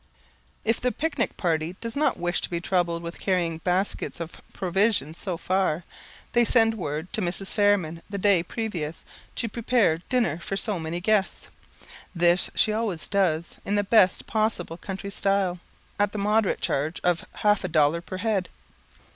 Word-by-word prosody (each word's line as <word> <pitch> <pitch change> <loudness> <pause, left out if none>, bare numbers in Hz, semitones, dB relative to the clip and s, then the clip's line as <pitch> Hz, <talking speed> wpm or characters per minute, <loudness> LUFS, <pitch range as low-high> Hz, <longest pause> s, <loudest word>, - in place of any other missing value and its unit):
If 225 +1 +1
the 250 - +1
pic 320 +1 -3
nic 235 - 0
party 165 0 0
does 230 0 -5
not 300 +2 +2
wish 175 0 0
to - - -2
be 170 - -2
troubled 170 -1 0
with 170 0 -7
carrying 175 -4 0
baskets 180 +1 -1
of 165 -1 -7
provisions 185 -4 0
so 180 -4 -3
far, 180 -2 0 0.5
they 240 -1 +5
send 225 -1 +4
word 160 -4 -4
to 220 - 0
Mrs. 185 +2 -3
Fairman 200 -6 +2
the 200 - -3
day 200 -3 +4
previous, 170 -5 -4 0.3
to 235 - -1
prepare 225 -6 +2
dinner 235 - +1
for 195 +3 -3
so 205 -3 +1
many 160 +2 -3
guests. 205 0 0 0.6
This 175 +1 +4
she 215 - +3
always 215 -7 -2
does 170 -5 0
in 200 - -1
the 205 - +2
best 200 -2 +4
possible 215 -6 -1
country 195 +2 -6
style, 195 -3 +1 0.4
at 205 0 +2
the - - -3
moderate 210 0 +1
charge 150 +5 -1
of 175 -1 +2 0.2
half 210 -1 +4
a - - -1
dollar 155 0 +3
per 185 +2 -7
head. 200 -2 0
190 Hz, 170 wpm, -26 LUFS, 170-210 Hz, 0.6 s, they